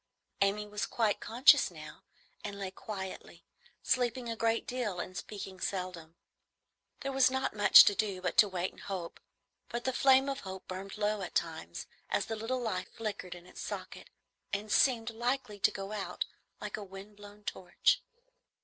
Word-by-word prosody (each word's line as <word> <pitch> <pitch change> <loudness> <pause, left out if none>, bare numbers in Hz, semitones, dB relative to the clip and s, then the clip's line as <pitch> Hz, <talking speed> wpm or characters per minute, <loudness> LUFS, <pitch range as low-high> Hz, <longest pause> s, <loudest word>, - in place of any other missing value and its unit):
Amy 200 +1 +2
was 210 0 -3
quite 225 -5 +1
conscious 245 +6 +6
now, - - -11 0.4
and 200 -1 -5
lay 195 -2 -4
quietly, 195 -4 -7 0.4
sleeping 245 -1 +1
a - - -2
great 225 0 +1
deal 240 -8 -2
and 185 +1 -5
speaking 195 -2 -6
seldom. 180 -4 -4 0.9
There 275 - -2
was 265 -1 +5
not 265 -3 -1
much 205 -1 +10
to 205 - +4
do 200 -2 -1
but 180 -1 -2
to 210 - +8
wait 185 -1 -2
and - - -15
hope; 185 -4 -5 0.5
but 240 0 -3
the 260 - 0
flame 265 +1 +5
of 275 0 -2
hope 190 -1 -8
burned 195 +2 -6
low 210 -1 0
at - - -6
times, - - -2 0.2
as - - +1
the 225 - -3
little 225 +4 -2
life 185 -6 -2
flickered 200 -5 -5
in 175 0 -12
its 180 - -10
socket, - - -6 0.4
and 205 +1 -2
seemed 235 -3 +4
likely 235 -2 -2
to - - +5
go 195 +1 -6
out 210 -2 -3 0.3
like - - -4
a 210 - -5
wind 195 +2 -11
blown 205 0 -13
torch. 180 -3 +1
210 Hz, 175 wpm, -32 LUFS, 190-235 Hz, 0.9 s, much